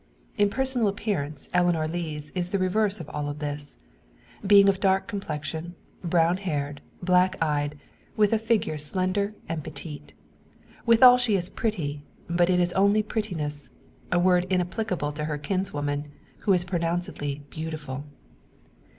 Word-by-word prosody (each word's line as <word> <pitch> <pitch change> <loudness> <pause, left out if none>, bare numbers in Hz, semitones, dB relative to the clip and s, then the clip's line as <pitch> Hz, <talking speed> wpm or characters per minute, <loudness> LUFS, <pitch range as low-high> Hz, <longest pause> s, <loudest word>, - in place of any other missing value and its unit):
In 205 0 +3
personal 260 -1 +3
appearance 190 -9 -3
Eleanor 175 -3 +2
Lees 155 -3 -4
is 180 -1 -2
the 200 - 0
reverse 195 +2 +1
of 160 - -7
all 145 0 -3
this; 145 -1 -6 0.7
being 200 0 +7
of 195 -1 +3
dark 190 -1 +2
complexion, 165 -2 -5 0.3
brown 170 0 +3
haired, 145 -7 -3 0.2
black 180 +1 +4
eyed, 150 -2 0 0.4
with 210 0 +4
a 225 - +3
figure 220 -8 0
slender 185 +7 -1
and 165 -2 -3
petite. 150 -1 -8 0.7
Withal 245 +2 +8
she 235 -4 +2
is 180 -2 -1
pretty; 160 - -2 0.3
but 175 +1 +2
it 180 -1 +3
is 175 0 +1
only 200 +2 +4
prettiness 165 -10 -3 0.4
a - - +3
word 180 0 +3
inapplicable 180 -3 -1
to 150 +1 -4
her 150 -1 -2
kinswoman, 145 -4 -2 0.3
who 200 - +2
is 175 -1 +2
pronouncedly 170 -5 -2
beautiful. 155 -4 -5
175 Hz, 140 wpm, -26 LUFS, 150-195 Hz, 0.7 s, Withal